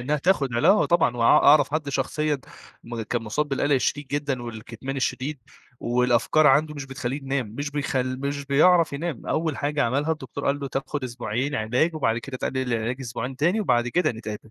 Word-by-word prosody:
إنها 145 +5 0
تاخد 150 -2 +2
عِلا 135 +8 +3
آه، 205 +2 +5
طبعًا 165 -8 +2
وأ 120 - -1
أعرف 145 +5 +6
حد 155 -2 -1
شخصيًا 145 +2 -1 0.5
م 115 -1 -5
كان 115 +2 -2
مصاب 145 +8 -2
بالقلق 145 +1 0
الشديد 140 +2 0
جدًا، 140 -2 -2
والكِتمان 120 +3 -7
الشديد، 135 +2 -2 0.4
والأفكار 125 +5 +2
عنده 150 +2 +4
مش 145 -2 -6
بتخلّيه 135 -1 -4
ينام، 135 -2 -1
مش 145 +6 -5
بيخل 130 -3 -2
مش 140 0 -3
بيعرف 165 +4 +4
ينام، 150 -2 -4
أول 160 -1 -1
حاجة 145 0 0
عملها 140 +6 +1
الدكتور 150 -2 -7
قال 140 +1 +1
له: 140 - -3
"تاخد 135 +1 -3
أسبوعين 120 +3 -3
علاج، 125 +8 +1
وبعد 115 -7 0
كده 130 +2 -7
تقلل 130 -1 -2
العلاج 115 +2 -1
أسبوعين 125 +1 -5
تاني، 175 +10 +2
وبعد 120 - +1
كده 165 +3 +1
نتقابل." 110 -1 -8
135 Hz, 185 wpm, -24 LUFS, 120-150 Hz, 0.5 s, أعرف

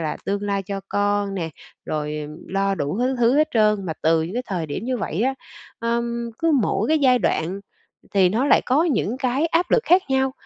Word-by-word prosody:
là 155 -2 -2
tương 200 +1 -2
lai 200 -1 -1
cho 195 +1 -5
con 205 -1 0
nè, 165 -4 -3 0.3
rồi, 150 0 -3
ừm, 150 0 -7
lo 195 +1 0
đủ 150 +2 -3
thứ 255 +2 +1
thứ 240 +3 +3
hết 305 +1 +3
trơn. 210 -3 +2
Mà 160 - -2
từ 160 0 +3
những 170 +5 -5
cái 250 - -1
thời 175 -5 -3
điểm 150 +8 -5
như 255 +1 -1
vậy 185 0 -2
á, 265 +2 +1 0.4
ờm, 235 0 -2
cứ 330 0 +2
mỗi 205 +2 0
cái 315 - +3
giai 255 -3 +4
đoạn 180 -2 -1 0.5
thì 190 -2 +5
nó 225 +8 0
lại - - +5
có 280 +6 +3
những 250 - 0
cái 265 +4 +1
áp 335 +2 0
lực 475 - +4
khác 360 +2 +5
nhau. 265 0 +2
210 Hz, 225 wpm, -22 LUFS, 190-255 Hz, 0.5 s, thì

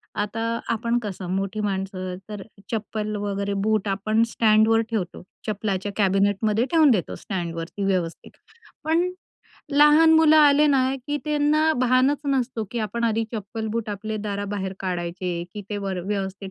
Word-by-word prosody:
आता 210 +2 -2 0.3
आपण 235 +1 0
कसं 195 -3 -5
मोठी 195 +2 -2
माणसं, 190 -2 -3
तर 205 -2 -6 0.3
चप्पल 215 -1 -3
वगैरे 200 -1 -2
बूट 215 -1 +1
आपण 215 +3 +1
स्टँडवर 220 0 +4
ठेवतो 185 -6 -3 0.2
चप्पलाच्या 205 -2 -2
कॅबिनेटमध्ये 205 +3 +2
ठेवून 315 -4 +5
देतो 200 -7 0
स्टँडवरती 170 0 -5
व्यवस्थित. 180 -4 -2 0.5
पण 330 +3 +2 0.6
लहान 300 +3 +6
मुलं 320 -1 +6
आले 295 0 +6
ना, 265 -2 +2
की 290 - -1
त्यांना 300 +1 +2
भानच 255 +3 +3
नसतो, 255 -4 0
की 240 - -3
आपण 225 +2 -2
आधी 225 0 +1
चप्पल-बूट 220 +1 -4
आपले 215 +2 -4
दाराबाहेर 200 -1 -3
काढायचे 175 -1 -3
की 210 - -6
ते 210 - -2
वर 195 -2 -3
व्यवस्थित 195 -1 -3
215 Hz, 140 wpm, -24 LUFS, 195-240 Hz, 0.6 s, लहान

